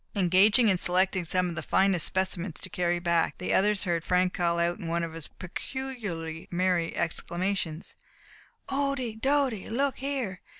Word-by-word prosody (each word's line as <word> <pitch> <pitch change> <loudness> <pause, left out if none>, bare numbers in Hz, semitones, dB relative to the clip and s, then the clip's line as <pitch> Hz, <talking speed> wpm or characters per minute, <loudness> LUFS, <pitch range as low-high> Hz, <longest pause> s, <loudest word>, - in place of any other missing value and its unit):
Engaged 195 +3 +5
in 220 -7 +4
selecting 185 0 +2
some 180 +2 +1
of 175 - -4
the 155 - -4
finest 190 -4 +3
specimens 185 -2 -2
to - - -5
carry 175 -3 0
back, 170 -1 +1
the 180 - -2
others 205 +1 +2
heard 170 -4 -1
Frank 180 +1 +2
call 170 -2 0
out, 170 +1 0
in 170 - -6
one 170 +1 0
of 165 -1 -4
his 165 -2 -6
peculiarly 185 -7 -5
merry 180 -1 0
exclamations: 170 0 -2 0.7
"Ohdy! 270 -5 -2
dody! 270 -6 +1
Look 270 +4 0
here! 265 -9 -3
185 Hz, 160 wpm, -28 LUFS, 170-215 Hz, 0.7 s, Engaged